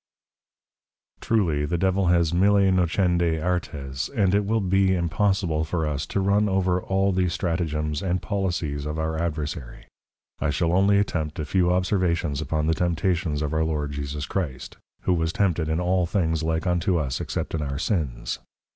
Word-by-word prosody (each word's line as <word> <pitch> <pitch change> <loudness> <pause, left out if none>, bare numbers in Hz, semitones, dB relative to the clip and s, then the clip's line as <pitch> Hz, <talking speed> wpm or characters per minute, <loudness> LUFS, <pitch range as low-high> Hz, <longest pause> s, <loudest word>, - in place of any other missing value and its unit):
_] - - -36
Truly, 85 -10 +1
the 75 +4 -1
Devil 95 +1 +1
has 85 -2 +3
Mille 100 +1 +4
Nocendi 85 -2 +2
Artes; 75 -6 -3
and 100 -8 +1
it 100 0 +2
will 110 +2 +1
be 95 -1 +2
impossible 85 -2 +1
for 80 0 -1
us, 75 -1 -2
to - - -1
run 100 +2 +2
over 95 -1 +1
all 95 +1 +1
the 90 -1 +1
Stratagems 80 -4 -1
and 90 -1 0
Policies 85 -9 -2
of 75 +1 -3
our 80 0 -2
Adversary. 75 -6 -4 0.5
I - - 0
shall 85 +3 +1
only 100 +2 +4
attempt 80 -7 -1
a 75 - -3
few 90 +3 +2
Observations 90 -5 0
upon 80 -1 -1
the 80 - +2
Temptations 85 -3 0
of 75 0 -2
our 80 0 +2
Lord 75 -2 -2
Jesus 70 0 -4
Christ: 75 -8 -4 0.3
who 90 - +1
was 80 -1 0
Tempted 85 -5 0
in 80 +1 0
all 90 0 +1
things 80 -4 0
like 80 +1 -1
unto 90 +1 +1
us, 70 -5 -2
except - - -3
in 80 - -1
our 70 -2 -3
Sins. 70 - -2
85 Hz, 175 wpm, -25 LUFS, 75-95 Hz, 0.5 s, Mille